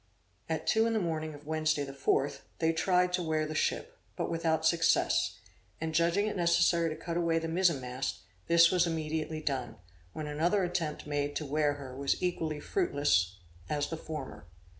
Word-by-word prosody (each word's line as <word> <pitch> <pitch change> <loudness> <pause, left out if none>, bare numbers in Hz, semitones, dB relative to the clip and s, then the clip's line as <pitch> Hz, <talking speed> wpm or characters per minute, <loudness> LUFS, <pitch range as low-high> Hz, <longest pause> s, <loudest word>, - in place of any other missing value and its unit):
At 160 0 -2
two 220 +1 +3
in 230 - 0
the 220 - +2
morning 160 -4 -2
of 145 0 -14
Wednesday 155 -1 0
the 135 -1 -7
fourth, 140 0 0 0.2
they 165 0 +2
tried 180 +2 +2
to 180 - +1
wear 155 -2 0
the 155 - -4
ship, - - -1 0.2
but - - -2
without 160 -1 0
success, 165 0 +2 0.4
and 160 0 -3
judging 170 +5 +2
it 215 - -2
necessary 170 -1 +3
to 155 - -4
cut 170 +1 -4
away 170 -1 +2
the 165 0 -1
mizen 170 -3 +2
mast, 125 +1 -4 0.3
this 170 0 +6
was 180 -2 +3
immediately 155 -1 -2
done, 130 -5 -2 0.4
when 155 - -5
another 165 +7 +1
attempt 170 -3 -2
made 145 -1 -2
to 150 - -2
wear 145 +1 +1
her 135 -3 -8
was 140 +1 0
equally 165 -4 -1
fruitless 145 - +1 0.3
as 145 -1 -1
the - - -1
former. 150 - -7
160 Hz, 185 wpm, -31 LUFS, 145-170 Hz, 0.4 s, this